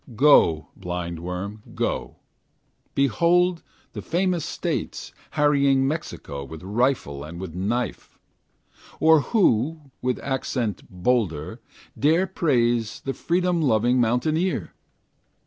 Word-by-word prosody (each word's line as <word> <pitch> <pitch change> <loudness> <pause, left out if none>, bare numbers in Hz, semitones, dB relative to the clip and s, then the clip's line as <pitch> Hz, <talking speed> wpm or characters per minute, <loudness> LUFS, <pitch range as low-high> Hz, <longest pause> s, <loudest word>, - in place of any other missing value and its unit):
Go, 105 - +5
blindworm, 90 +4 -5
go, - - -2 0.8
Behold 170 +7 +3 0.3
the - - -5
famous 180 -1 0
States - - -4 0.2
Harrying 140 -2 +3
Mexico 140 - -4
With 80 +4 -10
rifle 105 - 0
and 85 +3 -8
with 90 -4 -6
knife! 105 +5 -3 0.8
Or 160 0 +6
who, 150 - +1
with 125 0 0
accent 125 -5 -2
bolder, 90 -5 -1 0.3
Dare 160 +6 +3
praise 120 - 0
the 135 - -3
freedom 175 +1 0
loving 125 -2 +3
mountaineer? 155 +10 0
125 Hz, 95 wpm, -24 LUFS, 95-155 Hz, 0.8 s, Or